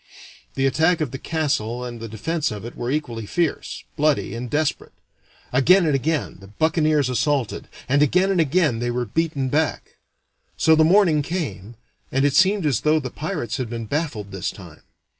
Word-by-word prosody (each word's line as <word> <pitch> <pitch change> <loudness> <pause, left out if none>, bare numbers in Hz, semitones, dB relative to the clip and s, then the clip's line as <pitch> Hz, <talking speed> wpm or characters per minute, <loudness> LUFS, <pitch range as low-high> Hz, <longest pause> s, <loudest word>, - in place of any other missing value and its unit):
The 135 - +1
attack 160 +6 +2
of 155 -6 -2
the 135 - -6
castle 130 -7 -2
and 120 -1 -7
the 115 - -6
defense 155 +9 -2
of 105 -1 -7
it 120 - -8
were 120 - -4
equally 120 -7 -3
fierce, 170 +3 -2
bloody, 150 -1 +1
and 120 +1 -5
desperate. 150 +2 -1 0.6
Again 175 +8 +5
and 155 - +2
again 135 - -1
the 95 - -13
buccaneers 155 - +1
assaulted, 130 -1 -1 0.2
and 140 +3 +2
again 180 +7 +3
and 180 -3 +3
again 150 -5 +2
they 120 +1 -1
were 120 0 -1
beaten 140 +3 -1
back. 155 +3 -1 0.6
So 160 - +4
the 160 - +5
morning 170 -3 +4
came, 120 - -4 0.4
and 135 +2 +2
it 145 - +2
seemed 190 +3 +3
as 140 -7 +2
though 155 +1 +3
the 130 -4 -6
pirates 150 - -4
had 130 -4 -3
been 115 -1 -5
baffled 115 -7 -3
this 95 0 -3
time. 85 -6 -12
145 Hz, 180 wpm, -22 LUFS, 120-160 Hz, 0.6 s, Again